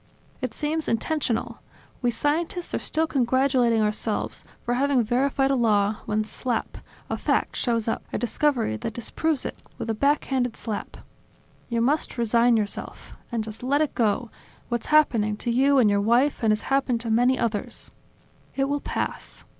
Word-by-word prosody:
It 255 -3 -3
seems 310 +1 -2
intentional; 245 0 -1 0.4
we 245 - +2
scientists 325 - -1
are - - 0
still 320 +1 0
congratulating 260 -4 +2
ourselves 210 0 -2 0.2
for 240 - 0
having 265 0 +2
verified 270 +4 +1
a - - +3
law, 210 -3 +2
when 215 0 +1
slap! 230 +2 -3 0.3
a - - -2
fact - - 0
shows 230 -3 0
up, 225 - -1
a - - -1
discovery 240 - 0
that 220 - -5
disproves 290 +4 -1
it, - - -4 0.2
with 225 - -3
a - - 0
back 280 +7 +2
handed 250 -4 -1
slap. 215 -3 -5 0.7
You 235 -1 0
must 280 +3 +1
resign 235 0 +4
yourself. 210 -2 -4 0.2
And 230 -2 -1
just 220 0 -8
let 275 +4 +1
it 305 -1 0
go, 230 0 0 0.4
what's 240 -1 -2
happening 230 -9 +3
to 235 - -2
you 275 +3 +4
and 245 -5 +5
your 200 -1 +3
wife 240 +7 +2
and 225 - +2
has 215 0 +2
happened 270 -3 +1
to 230 -1 -2
many 245 +3 +4
others. 220 -4 -3 0.6
It 270 - +1
will 285 0 -1
pass. - - -4
240 Hz, 170 wpm, -25 LUFS, 225-275 Hz, 0.7 s, and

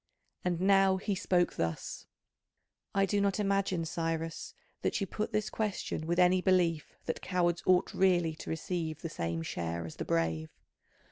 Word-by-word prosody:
And 175 -2 0
now 195 0 +5
he 200 +2 -1
spoke 180 -2 +1
thus: 80 -1 -3 0.9
"I 195 0 +4
do 200 +1 +1
not 200 +1 +1
imagine, 195 -4 +1
Cyrus, 165 -1 -3 0.3
that - - 0
you 195 - 0
put 210 +3 -3
this 215 0 -1
question 200 -7 -2
with 170 +1 0
any 180 0 +5
belief 175 -4 +1
that 160 - -3
cowards 175 -2 +1
ought 185 -1 +4
really 175 -4 +3
to - - -8
receive 160 -1 -3
the 165 - -2
same 85 - -3
share 85 0 -3
as 80 - -9
the - - -3
brave. 80 -1 0
175 Hz, 160 wpm, -31 LUFS, 160-190 Hz, 0.9 s, now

